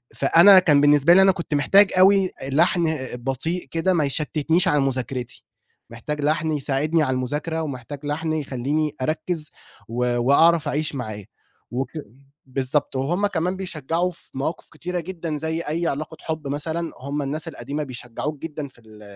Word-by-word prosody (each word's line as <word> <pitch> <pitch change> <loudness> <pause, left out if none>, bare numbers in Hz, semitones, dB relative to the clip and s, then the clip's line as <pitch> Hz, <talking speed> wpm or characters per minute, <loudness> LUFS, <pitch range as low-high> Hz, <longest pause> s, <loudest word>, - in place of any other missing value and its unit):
فأنا 170 +7 +7
كان 150 -6 +4
بالنسبة 145 +2 +5
لي 190 - +7
أنا 190 0 +6
كنت 170 -3 -5
محتاج 195 +8 +5
أوي 190 0 +5
لحن 160 +3 +2 0.2
بطيء 135 +8 -3
كده 165 +3 +1
ما 165 -4 +2
يشتتنيش 155 +5 +1
على 150 -3 +3
مذاكرتي، 130 -2 -3 0.4
محتاج 145 +6 -5
لحن 155 +2 0
يساعدني 150 +2 0
على 130 -3 0
المذاكرة 150 +6 -2
ومحتاج 140 -1 -6
لحن 155 +2 -2
يخلّيني 145 +1 -2
أركز، 155 +2 -2 0.4
و 120 +1 -1
وأعرف 155 +6 +4
أعيش 150 0 -1
معاه، 110 -5 -5 0.5
وك 125 +1 -2 0.6
بالضبط 135 +2 -1
وهُمّ 170 +10 0
كمان 180 -1 -1
بيشجعوا 175 -1 -2
في 170 - -12
مواقف 145 +5 -3
كتيرة 180 0 -4
جدًا 165 -2 -5
زيّ 160 +2 -2
أيّ 165 +2 -2
علاقة 155 +3 -4
حب 160 -3 -4
مثلًا 160 +4 -3
هُمّ 140 +3 -3
الناس 145 +3 -3
القديمة 145 +2 -4
بيشجعوك 130 +3 -5
جدًا 150 -2 -5
في 130 -3 -19
ال 110 -1 -16
150 Hz, 155 wpm, -23 LUFS, 135-165 Hz, 0.6 s, فأنا